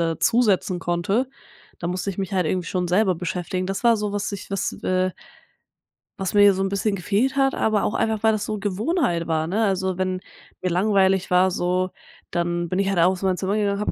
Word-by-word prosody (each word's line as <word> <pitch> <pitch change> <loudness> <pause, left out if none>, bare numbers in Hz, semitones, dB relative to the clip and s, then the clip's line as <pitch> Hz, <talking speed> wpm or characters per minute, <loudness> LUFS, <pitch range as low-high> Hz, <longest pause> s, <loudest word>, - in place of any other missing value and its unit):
dazusetzen 190 -6 +2
konnte. 195 +10 0 0.5
Da 170 - -3
musste 185 +2 -2
ich 190 - -6
mich 195 0 -3
halt 180 -3 +1
irgendwie 180 +1 -1
schon 180 -1 -1
selber 185 0 +2
beschäftigen. 180 +1 -3
Das 195 +4 -3
war 235 -1 +5
so, 210 -1 -2
was 205 0 -2
ich 200 0 -7
was, 195 - -1
äh 185 0 +1 1.1
was 190 -1 -2
mir 205 -1 +7
so 190 - -2
'n 195 - 0
bisschen 200 +1 0
gefehlt 205 +8 0
hat. 270 -1 +2
Aber 215 -2 +1
auch - - 0
einfach, 220 -2 0
weil 220 - +4
das 210 -1 -2
so 215 - -3
Gewohnheit 205 - 0
war, 160 -1 0
ne, 210 +6 0
also, 190 -2 0
wenn 185 0 -1 0.4
mir 185 - 0
langweilig 190 0 +2
war, 185 +1 +4
so, 180 +1 0 0.4
dann 175 0 -1
bin 185 +3 -1
ich 195 - +1
halt 195 -3 0
aus 180 +2 +3
meinem 185 -1 +1
Zimmer 195 +2 -1
gegangen 205 -2 +1
und - - -5
habe - - 0
190 Hz, 215 wpm, -23 LUFS, 180-205 Hz, 1.1 s, mir